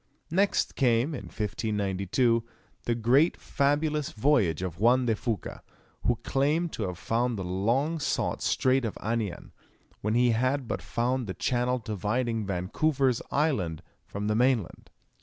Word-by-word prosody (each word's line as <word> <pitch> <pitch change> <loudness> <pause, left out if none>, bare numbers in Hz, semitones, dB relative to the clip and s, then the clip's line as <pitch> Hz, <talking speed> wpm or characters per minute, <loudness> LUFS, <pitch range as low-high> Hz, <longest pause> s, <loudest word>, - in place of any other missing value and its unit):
Next 195 +4 +1
came, 125 +3 +2
in 130 - -6
1592, 105 +2 0 0.4
the 120 - +1
greatly 125 +8 +3
fabulous 150 +1 0
voyage 105 - +2
of 90 -2 -5
Juan 125 +4 +4
de 115 -2 +2
Fuca, 110 -1 -4 0.5
who 120 - +4
claimed 155 +5 +1
to 105 - -2
have 90 -1 -5
found 120 +3 0
the 95 - -3
long 120 - 0
sought 145 - -1
Strait 130 0 +2
of 115 - -3
Anian, 110 -4 -3 0.5
when 110 +2 0
he 120 0 +4
had 130 +3 0
but - - -3
found 125 0 -1
the 95 - -4
channel 125 0 0
dividing 110 0 -2
Vancouver's 125 - 0
Island 95 - 0 0.2
from 100 +1 -5
the 105 - +2
mainland. 120 -4 0
120 Hz, 140 wpm, -28 LUFS, 105-135 Hz, 0.5 s, Juan